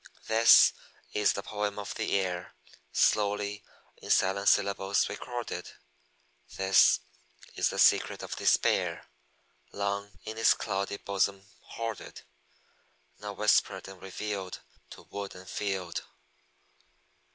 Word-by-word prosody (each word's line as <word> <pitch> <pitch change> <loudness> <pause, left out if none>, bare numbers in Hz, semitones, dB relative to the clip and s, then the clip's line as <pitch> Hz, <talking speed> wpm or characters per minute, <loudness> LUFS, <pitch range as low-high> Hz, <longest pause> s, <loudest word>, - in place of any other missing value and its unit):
This 115 +1 +7 0.4
is 105 -1 +2
the 100 - -5
poem 105 -1 -3
of 100 -1 -5
the - - -1
air, 90 -2 -4 0.4
Slowly 105 - +1 0.3
in - - -11
silent 100 +2 +3
syllables 100 0 +2
recorded; 120 -1 -5 0.9
This 95 -8 +5 0.5
is - - +1
the - - -5
secret - - +3
of - - -5
despair, - - +1 0.7
Long 100 0 -3
in 110 +1 -6
its 115 - +5
cloudy 100 +1 -3
bosom 100 0 -1
hoarded, 115 -2 -7 1.0
Now 105 0 -6
whispered 105 0 +2
and 95 -1 -12
revealed 95 0 -5 0.3
To - - -12
wood 100 -1 -7
and 90 0 -12
field. 95 -4 -3
100 Hz, 110 wpm, -29 LUFS, 95-105 Hz, 1.0 s, This